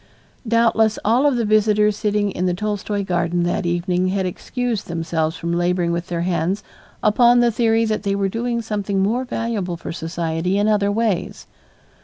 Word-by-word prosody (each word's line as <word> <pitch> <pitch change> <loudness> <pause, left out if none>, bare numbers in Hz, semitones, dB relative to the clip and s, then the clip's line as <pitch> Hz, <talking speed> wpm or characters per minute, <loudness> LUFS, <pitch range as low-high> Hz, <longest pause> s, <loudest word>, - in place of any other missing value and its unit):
Doubtless 225 -1 +3
all 240 +7 +4
of 280 - +2
the 235 -2 0
visitors 210 0 +3
sitting 205 -1 0
in 180 0 -1
the 180 - 0
Tolstoy 205 0 -2
garden 175 -1 0
that 175 +2 -1
evening 175 +1 0
had 190 0 0
excused 235 +4 -3
themselves 165 -1 -2
from 170 0 -3
laboring 175 0 +1
with 170 +1 -3
their 170 -2 -2
hands 175 +2 -1 0.4
upon 240 +3 +5
the 240 -1 +4
theory 225 0 +2
that 215 -1 -1
they 200 -1 -1
were 200 -1 0
doing 235 +3 -2
something 200 -3 -1
more 240 +6 0
valuable 225 -8 -3
for - - -7
society 165 +2 -2
in 205 +1 +2
other 205 -1 +2
ways. 210 -4 -1
200 Hz, 175 wpm, -21 LUFS, 175-220 Hz, 0.4 s, upon